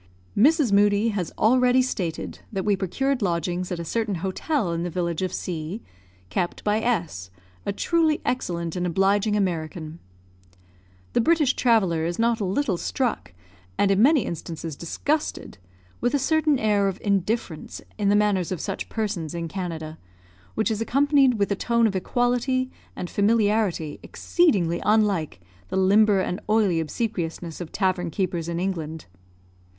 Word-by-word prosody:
Mrs. 285 +1 +4
Moodie 205 +2 +4
has 195 -6 -3
already 250 +2 +4
stated 175 -10 -4
that 195 -3 -3
we 205 -1 +3
procured 260 +8 -1
lodgings 175 0 -1
at 180 - -2
a 170 - -5
certain 220 +1 -1
hotel 190 - -1
in 165 - -2
the 175 - -2
village 170 -1 -2
of 185 -2 -1
C 175 +5 -5 0.5
kept 175 - -2
by 210 +1 +1
S, 170 - -2 0.4
a - - +2
truly 320 - +1
excellent 170 -9 -2
and 180 0 -1
obliging 195 +4 +2
American. 165 -4 -2 1.1
The - - +3
British 305 -1 +3
traveller 195 -10 +2
is 170 +1 -2
not 230 0 +2
a 205 - -1
little 195 0 0
struck, 240 - -2 0.4
and 200 - +3
in 195 +1 +3
many 275 -1 +5
instances 165 -1 -5
disgusted, 285 - -3 0.4
with 245 +4 +1
a - - +4
certain 310 +1 +2
air 205 -3 +2
of 195 0 -3
indifference 200 -4 -1 0.2
in 200 -1 +2
the 205 - +4
manners 205 -4 +2
of 185 - -2
such - - -4
persons 195 -7 -3
in 170 -1 -3
Canada, 160 -3 -5 0.6
which 220 +1 +1
is 220 0 -2
accompanied 275 +1 +3
with 205 -1 0
a - - +2
tone 235 +3 +2
of 205 -3 +1
equality 245 +5 0 0.2
and 180 - -4
familiarity 205 -6 +1
exceedingly 195 - +1
unlike 200 - +1 0.3
the 190 - -3
limber 200 +1 +4
and 180 +1 -2
oily 210 -6 +3
obsequiousness 170 -1 -3
of 170 - -7
tavern 185 -3 0
keepers 175 -1 -2
in 170 0 -2
England. 160 -4 -3
200 Hz, 155 wpm, -24 LUFS, 170-230 Hz, 1.1 s, many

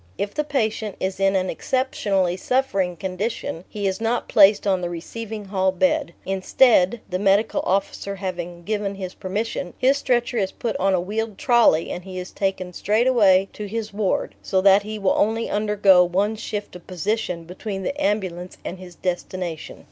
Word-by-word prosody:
If 200 0 -3
the 300 - 0
patient 220 -7 -1
is 190 0 -2
in 195 0 +3
an 185 0 +1
exceptionally 195 -6 0
suffering 195 -5 0
condition 190 0 -4
he 205 -1 -4
is 190 +3 -1
not 230 +2 0
placed 205 0 +5
on 190 -2 +2
the 175 - -2
receiving 210 +5 -6
hall 190 -1 +1
bed; 280 - 0
instead 195 +2 +3
the 185 0 -2
Medical 200 +2 +2
Officer 200 +1 -1
having 175 -2 -5
given 205 0 -2
his 185 -2 -6
permission 190 -1 -4
his 270 +2 +3
stretcher 240 -2 0
is 190 -2 0
put 230 -3 -3
on 195 0 +2
a - - +1
wheeled 210 +3 -3
trolley 235 -10 +3
and 180 - -5
he 185 0 -8
is 180 0 -6
taken 190 -2 -2
straight 215 +7 +1
away 195 -7 +5
to 210 - -6
his 215 0 -4
ward, 205 -2 -1
so 190 - 0
that 195 +1 +6
he 215 +1 -6
will 195 -2 +2
only 225 +2 +1
undergo 205 -3 +4
one 195 +5 0
shift 210 -3 -5
of 180 - -12
position 180 -1 -2
between 195 +3 -6
the 285 +9 -3
ambulance 185 -5 -2
and 180 - -5
his 180 -2 -11
destination. 180 -2 -4
195 Hz, 180 wpm, -23 LUFS, 185-220 Hz, -, that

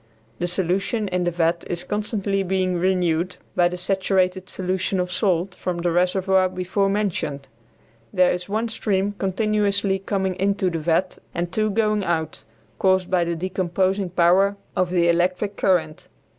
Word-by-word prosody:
The 175 - 0
solution 190 +5 -1
in 180 -1 0
the - - +2
vat 170 0 0
is 175 -1 -3
constantly 205 -1 -1
being 185 -1 0
renewed 180 -1 0 0.2
by 175 - +4
the 180 +1 -4
saturated 185 0 0
solution 185 +1 -2
of 180 0 -1
salt 185 -1 0
from 180 -1 -3
the 170 0 0
reservoir 185 +2 +2
before 185 +2 0
mentioned. 190 -9 -2 0.6
There 180 -1 +4
is 180 +2 -4
one 220 +3 -1
stream 205 -2 0
continuously 200 0 +1
coming 190 -1 -1
into 195 -1 +1
the 165 - -2
vat 170 +4 0 0.2
and 175 0 -2
two 215 0 +1
going 210 -1 +1
out, 160 -3 -2 0.3
caused 190 -1 +2
by 180 -2 +3
the 170 0 -1
decomposing 185 +2 -1
power 185 +3 +3 0.2
of 185 -1 +1
the 175 -1 +2
electric 180 +4 +1
current. 165 -6 0
185 Hz, 155 wpm, -23 LUFS, 175-195 Hz, 0.6 s, by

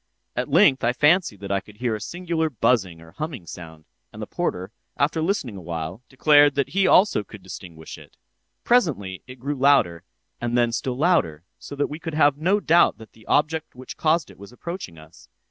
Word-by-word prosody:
At - - -2
length 135 -1 +4
I 120 +1 +2
fancied 150 - +2
that 100 0 -6
I 100 - +1
could 105 +2 -17
hear 120 0 -1
a 105 - -4
singular 170 +4 -2
buzzing 100 - 0
or 80 0 -15
humming 140 - -6
sound; 80 -1 -11 0.3
and - - -12
the - - -4
porter, 95 +3 -3 0.3
after 155 +2 +1
listening 155 - -2
awhile, 85 +2 -6
declared 145 +1 +5
that 140 -1 0
he 195 0 +2
also 185 - +4
could 105 -2 -13
distinguish 85 -4 -10
it. - - -18 0.5
Presently 130 - +1
it 130 0 -11
grew 140 +4 -3
louder, 135 - +3 0.4
and 120 0 -1
then 120 -1 +2
still 125 +2 -3
louder, 130 - +1 0.2
so 145 - -9
that 145 0 0
we 150 +2 -7
could 165 -2 -6
have 145 -2 +4
no 185 +8 +1
doubt 170 -3 +3
that 110 -1 -14
the 110 - -21
object 155 0 0
which 130 +1 -9
caused 160 -1 +1
it - - -19
was 100 +2 -12
approaching 160 - -7
us. 80 +1 -17
125 Hz, 195 wpm, -23 LUFS, 95-155 Hz, 0.5 s, declared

